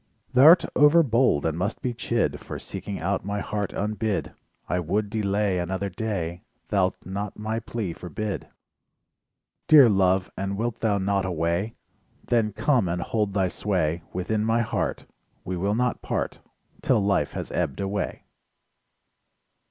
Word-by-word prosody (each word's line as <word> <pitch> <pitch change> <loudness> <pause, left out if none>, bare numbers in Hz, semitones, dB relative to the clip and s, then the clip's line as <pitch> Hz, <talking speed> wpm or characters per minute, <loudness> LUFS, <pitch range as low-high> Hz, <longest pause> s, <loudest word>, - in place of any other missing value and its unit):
Thou'rt 155 +8 +8
overbold 135 - +4
and 80 -1 0
must 95 +6 -2
be 125 - -1
chid 120 0 -1
For - - -7
seeking 100 - -6
out 95 +4 -1
my 100 +1 -2
heart 105 -1 -3
unbid, 105 0 -2 0.3
I 90 - 0
would 100 +5 -1
delay 100 -3 0
Another 95 +3 -2
day, 90 -4 -3 0.3
Thou'lt 95 -3 0
not 100 +2 -4
my 110 +1 -2
plea 110 -5 -4
forbid? 100 +4 -5 1.2
Dear 145 -6 +8
Love, 95 -1 +2
and 100 0 -3
wilt 115 +1 -2
thou 105 -3 +1
not 100 0 0
away? 85 +4 -1 0.5
Then 115 -3 +2
come 115 0 +2
and 85 0 -1
hold 105 -3 -1
thy 95 -2 +2
.sway 90 -4 -1
Within 105 +4 -1
my 115 +1 +2
heart, 95 - -2 0.4
We 90 - -3
will 100 +4 0
not 125 +1 0
part, - - -3 0.4
'Till 100 - +2
life 100 0 +1
has - - -5
ebbed - - -1
away. 100 -1 -3
100 Hz, 145 wpm, -25 LUFS, 95-110 Hz, 1.2 s, Thou'rt